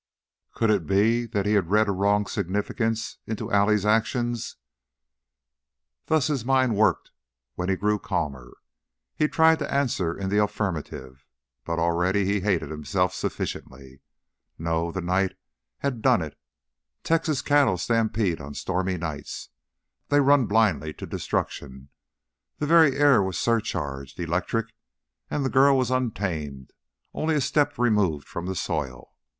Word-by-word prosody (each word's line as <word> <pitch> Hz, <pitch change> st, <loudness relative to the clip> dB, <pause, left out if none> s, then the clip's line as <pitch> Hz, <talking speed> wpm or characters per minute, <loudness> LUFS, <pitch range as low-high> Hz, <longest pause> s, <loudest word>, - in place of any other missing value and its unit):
Could 115 Hz, -2 st, +2 dB
it 95 Hz, -7 st, 0 dB
be 115 Hz, +6 st, +2 dB
that 105 Hz, -3 st, -2 dB
he 105 Hz, -, +2 dB
had 95 Hz, -5 st, +1 dB
read 105 Hz, +1 st, +3 dB
a -, -, +1 dB
wrong 100 Hz, +2 st, +2 dB
significance 110 Hz, +3 st, -2 dB
into 110 Hz, -2 st, -4 dB
Allie's 100 Hz, 0 st, +3 dB
actions? 115 Hz, +2 st, 0 dB, 1.5 s
Thus 155 Hz, -4 st, +2 dB
his 140 Hz, -6 st, -1 dB
mind 130 Hz, -2 st, +2 dB
worked 110 Hz, +1 st, +1 dB, 0.4 s
when 90 Hz, +1 st, -3 dB
he 95 Hz, -, +2 dB
grew 105 Hz, +2 st, 0 dB
calmer. 70 Hz, -, -4 dB, 0.6 s
He 150 Hz, -, +2 dB
tried 160 Hz, +1 st, +4 dB
to -, -, -4 dB
answer 120 Hz, -12 st, 0 dB
in 95 Hz, -1 st, -3 dB
the 105 Hz, +1 st, +3 dB
affirmative, 80 Hz, -11 st, -4 dB, 0.4 s
but 85 Hz, 0 st, -2 dB
already 90 Hz, +4 st, +1 dB
he 100 Hz, +1 st, +1 dB
hated 95 Hz, -6 st, -1 dB
himself 90 Hz, +4 st, -1 dB
sufficiently. 65 Hz, -4 st, -6 dB, 0.6 s
No, 85 Hz, +1 st, -1 dB
the 95 Hz, -, -4 dB
night 95 Hz, +2 st, 0 dB, 0.5 s
had 130 Hz, -5 st, -2 dB
done -, -, +3 dB
it. -, -, -8 dB, 0.7 s
Texas 160 Hz, -3 st, 0 dB
cattle 145 Hz, -10 st, +3 dB
stampede 110 Hz, -3 st, 0 dB
on 70 Hz, +1 st, -8 dB
stormy 95 Hz, 0 st, -2 dB
nights. 75 Hz, -4 st, -6 dB, 0.6 s
They 145 Hz, -, +3 dB
run 140 Hz, -3 st, +4 dB
blindly 95 Hz, -9 st, +2 dB
to -, -, -7 dB
destruction. 65 Hz, 0 st, -4 dB, 0.7 s
The 150 Hz, -, -2 dB
very 160 Hz, -3 st, +5 dB
air 140 Hz, -6 st, +5 dB
was 95 Hz, -1 st, -2 dB
surcharged, 70 Hz, -, -2 dB
electric, 90 Hz, +7 st, -2 dB, 0.6 s
and 145 Hz, -, -1 dB
the 130 Hz, -, -1 dB
girl 135 Hz, +1 st, +5 dB
was 130 Hz, -1 st, 0 dB
untamed, 85 Hz, -, -3 dB, 0.4 s
only 160 Hz, 0 st, 0 dB
a -, -, +2 dB
step 145 Hz, +2 st, +1 dB
removed 105 Hz, -11 st, +1 dB
from 85 Hz, +1 st, -6 dB
the 95 Hz, -, -3 dB
soil. 65 Hz, -7 st, -4 dB
100 Hz, 140 wpm, -25 LUFS, 85-120 Hz, 1.5 s, very